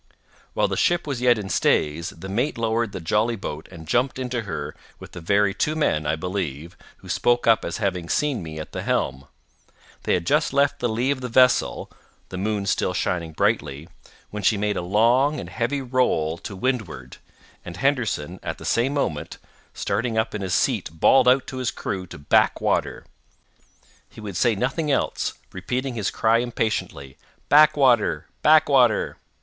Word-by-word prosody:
While - - +2
the - - -3
ship 175 0 +1
was 135 -5 -4
yet 125 -2 +4
in 105 -2 -5
stays, 80 -3 +1
the 90 +3 -10
mate 115 +9 -1
lowered 115 -1 0
the 95 - -6
jolly 105 +8 0
boat 80 -7 -7
and 80 -3 -12
jumped 125 - +1
into 125 -2 -3
her 75 - -5 0.2
with - - -12
the 85 - -9
very 100 +3 +2
two 155 +9 -1
men, 75 - 0
I 75 - +1
believe, 85 -2 -4 0.2
who - - -16
spoke 120 0 +1
up 115 -1 +4
as 85 - -4
having 90 -5 -2
seen 145 -7 0
me 80 -2 -8
at 80 - -8
the - - -5
helm. 65 0 -2 0.7
They - - +1
had 85 -2 -3
just 150 - +1
left 140 0 +2
the 120 - 0
lee 120 +5 0
of 135 -2 -3
the 125 - -4
vessel 125 +1 +2 0.4
(the 90 - -6
moon 105 0 -1
still - - 0
shining 85 -3 -2
brightly) 75 0 -1 0.4
when 105 - -5
she 100 +2 +2
made 105 0 -1
a - - -2
long 120 +10 +2
and - - -7
heavy 135 +4 -2
roll 120 -11 0
to 100 - -8
windward, 95 - -3 0.5
and 85 0 -9
Henderson, 110 - -1
at - - -5
the - - -11
same 130 +5 +1
moment, 80 - -2 0.4
starting 110 +3 -2
up 110 0 0
in 105 - -4
his 95 -2 -1
seat - - 0
bawled 80 +11 +4
out 130 +1 +4
to 130 - -7
his 130 -2 -1
crew 95 -1 -5
to - - -10
back 70 - +2
water. - - -1 1.0
He - - -14
would 105 -4 -7
say 115 +4 +2
nothing 135 +8 -1
else—repeating 130 -1 -2
his 105 -4 -2
cry 115 +1 +2
impatiently, 110 - -3 0.3
back 150 +1 +6
water! 125 -6 +3 0.2
back 155 0 +5
water! 125 -6 +3
110 Hz, 180 wpm, -23 LUFS, 90-130 Hz, 1.0 s, back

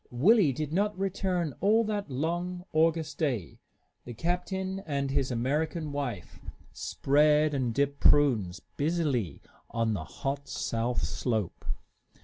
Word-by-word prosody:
Willie 170 - +5
did 150 +3 -4
not 205 +2 +1
return 185 -5 -1
all 220 +3 +4
that 210 -5 -2
long, 175 +6 -2
August 160 -1 +2
day. 125 - -1 0.4
The 120 - -8
captain 185 - -2
and 140 -2 -1
his 135 -1 +1
American 150 +6 -1
wife 125 - -4 0.3
spread 150 +2 +3
and 130 -4 0
dipped 140 +3 0
prunes 115 -12 +4 0.2
busily 145 - 0 0.3
on 115 -1 0
the 95 -6 -3
hot 140 - -4
south 115 -3 -1
slope. 105 - -2
145 Hz, 125 wpm, -29 LUFS, 125-175 Hz, 0.4 s, Willie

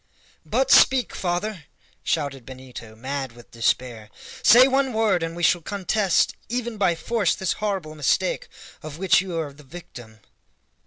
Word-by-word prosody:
"But - - +1
speak, 260 -4 +5
father!" 180 -1 -3 0.4
shouted 140 -5 -2
Benito, 125 -3 -11
mad 135 +1 -5
with 120 0 -17
despair; 115 -2 -1 0.3
"say 245 +4 +7
one 270 -1 +1
word, 220 -5 +1
and 165 0 -4
we 175 - -6
shall 175 +1 +3
contest 195 0 0
even 240 -1 -3
by 185 -4 +2
force 210 +1 0
this 190 - -1
horrible 190 -7 -2
mistake 155 +5 0 0.3
of 155 -1 -8
which 185 0 +3
you 180 -3 -5
are 145 -3 -5
the 145 - -16
victim!" 125 -8 -12
170 Hz, 150 wpm, -23 LUFS, 135-205 Hz, 0.4 s, say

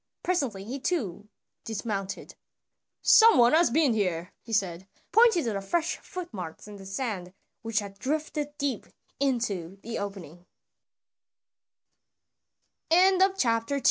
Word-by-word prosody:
Presently 270 - -1
he 250 +7 -5
too 210 - -2 0.3
dismounted. 200 -3 -4 0.7
"Some 455 -1 +7
one 240 +2 +6
has 335 +1 +5
been 285 0 +3
here," 180 -4 -1
he 230 - -12
said, 190 -4 -1 0.2
pointing 445 -4 +5
to 230 -3 -1
the 195 - -3
fresh 330 - -1
footmarks 210 - -8
in 205 -1 -10
the 195 -1 -11
sand 195 -4 -4 0.3
which 225 -2 -4
had 200 -2 -2
drifted 295 +2 -3
deep 280 -6 -2 0.3
into 210 -10 -1
the 230 0 -4
op 200 -1 -4
225 Hz, 110 wpm, -27 LUFS, 195-290 Hz, 0.7 s, Some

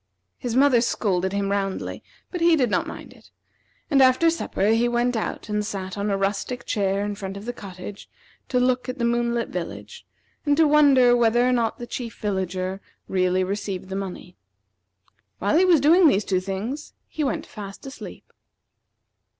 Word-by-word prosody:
His 240 -2 -3
mother 260 -3 +5
scolded 190 -6 0
him 200 0 -1
roundly, 195 -1 -2 0.3
but 355 - -4
he 335 -1 +5
did 250 -7 +1
not - - +1
mind - - -9
it; - - -20 0.6
and 280 -3 +3
after 260 +6 +5
supper 210 -10 -1
he 230 +2 +3
went 240 +1 +1
out 220 - -3
and 210 -1 -1
sat 190 -2 -5
on 205 +1 -2
a 200 - +1
rustic 200 +5 -2
chair 200 -1 0
in 205 - -2
front 195 -1 -6
of 200 - -9
the 245 - -3
cottage 195 -2 -9 0.4
to 250 - +2
look 250 0 +1
at 255 - -4
the 235 - 0
moonlit 235 0 0
village, 180 -2 -7 0.4
and 290 -1 +2
to 320 -1 +5
wonder 275 -5 +6
whether 240 +1 +3
or - - +3
not 235 -2 0
the 240 - -6
Chief 235 -1 -6
Villager 190 -1 -2 0.3
really 185 0 +1
received 195 -1 -4
the 190 - -4
money. 185 -2 -6 1.0
While 200 +9 0
he 360 +3 +5
was 350 -4 +5
doing 325 +5 +6
these 210 -7 +2
two 185 -2 +1
things, 200 +10 -5
he 310 - -3
went 265 -6 -1
fast 200 +1 -9
asleep. 270 +1 -10
225 Hz, 180 wpm, -24 LUFS, 195-255 Hz, 1.0 s, wonder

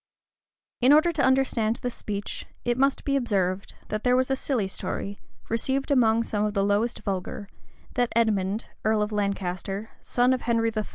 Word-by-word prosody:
[] - - -58
In 255 +4 +7
order 310 +3 +5
to 300 -3 -1
understand 260 -4 +2
this 245 -1 -2
speech, 205 -1 -5 0.2
it 240 0 +2
must 275 +2 +1
be 280 - +1
observed, 195 -7 0
that 215 0 -2
there 250 0 +4
was 255 +1 +1
a - - +3
silly 255 -6 -1
story, 200 +1 -4 0.3
received 265 +5 -1
among 230 -4 +4
some 210 -2 -1
of 210 0 -1
the 195 - +2
lowest 205 +4 0
vulgar, 195 0 -3 0.5
that 245 -2 +1
Edmond, 210 -2 +1 0.2
earl 215 -1 +2
of 210 - -3
Lancaster, 200 0 -2
son 250 +1 +2
of 255 - -1
Henry 230 -1 +1
III. 215 -1 -1
225 Hz, 180 wpm, -26 LUFS, 205-255 Hz, 0.5 s, In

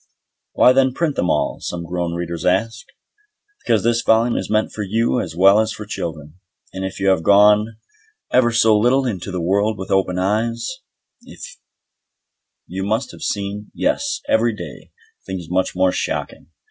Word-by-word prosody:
"Why 125 - +5
then 130 -1 +2
print 160 -4 -1
them 90 - 0
at - - -1
all?" 75 - 0
some 85 -1 -5
grown 85 0 -3
reader 85 0 -4
asks. 115 +4 0 0.8
Because - - +1
this 115 0 +2
volume 115 +1 +2
is - - -3
meant 110 0 +1
for 110 - -6
you 115 +5 0
as 80 -3 -6
well 95 +4 +6
as 110 0 0
for 105 - -8
children, 80 -4 -6 0.3
and 95 - -5
if 95 +1 -5
you 95 0 +2
have 95 -4 +2
gone 105 +4 +4 0.5
ever 120 -2 +3
so 115 -1 +4
little 125 +5 +2
into 100 -6 -4
the 90 -1 -3
world 100 +4 +1
with 95 - -7
open 95 -2 +1
eyes, 115 +5 -1 2.0
you 95 +2 -5
must 110 +6 -1
have - - -14
seen, 100 +1 -4
yes, 285 0 -1
every 115 0 +2
day, 85 -8 -10 0.4
things 90 -3 -6
much 95 0 0
more 95 0 +2
shocking. - - -4
105 Hz, 170 wpm, -20 LUFS, 90-115 Hz, 2.0 s, well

